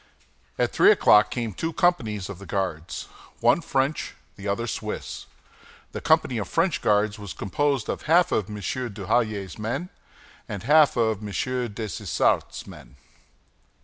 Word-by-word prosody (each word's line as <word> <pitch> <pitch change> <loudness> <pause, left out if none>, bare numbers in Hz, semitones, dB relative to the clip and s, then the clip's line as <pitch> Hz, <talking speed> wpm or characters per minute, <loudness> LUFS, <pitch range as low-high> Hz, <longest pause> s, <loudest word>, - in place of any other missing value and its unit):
At - - +1
three - - +5
o'clock 105 0 +6
came 115 -4 -3
two 165 - -3
companies 130 - +1
of 100 -3 -8
the 100 - -11
Guards, 90 -5 -3 0.4
one - - +4
French, 135 0 -1 0.2
the 100 - -8
other 100 +4 -1
Swiss. 115 - -5 0.6
The - - -6
company 155 -7 +2
of 100 - -4
French 165 - +1
guards 105 0 +2
was 100 -3 -7
composed 140 +4 -1
of - - -3
half 170 +2 +5
of 105 -1 0
M. 105 - -6
Duhallier's 105 -2 -2
men 130 +12 -3 0.6
and 100 -1 -5
half 150 +1 +5
of 110 -3 +1
M. 105 - -6
Dessessart's 120 -4 -1
men. - - -13
110 Hz, 145 wpm, -25 LUFS, 100-135 Hz, 0.6 s, o'clock